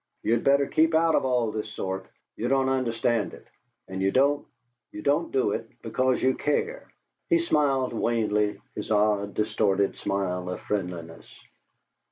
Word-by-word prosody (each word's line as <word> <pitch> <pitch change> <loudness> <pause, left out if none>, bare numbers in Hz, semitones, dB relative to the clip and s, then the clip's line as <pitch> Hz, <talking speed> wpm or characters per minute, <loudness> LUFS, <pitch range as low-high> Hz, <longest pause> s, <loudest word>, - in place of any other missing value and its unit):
"You'd 115 +1 +1
better 140 0 +4
keep 160 +3 +2
out 165 0 +4
of - - +2
all 125 -4 +1
this 110 0 -4
sort. 95 -2 -4 0.3
You 120 - -2
don't 135 0 +2
understand 115 -4 0
it, - - -17 0.4
and 95 0 -5
you 95 - +3
don't 140 +6 +2 0.4
you 105 - -8
don't 150 +4 +1
do 130 -6 +2
it 115 - -4
because 130 +3 0
you 130 0 +4
care." 455 - -1 0.4
He 340 - +5
smiled 145 - +1
wanly, 105 -3 0
his 105 - -6
odd 105 -1 +1
distorted 105 -2 +1
smile 90 -2 -2
of 90 - -4
friendliness. 90 -5 -4
115 Hz, 155 wpm, -26 LUFS, 100-135 Hz, 0.4 s, He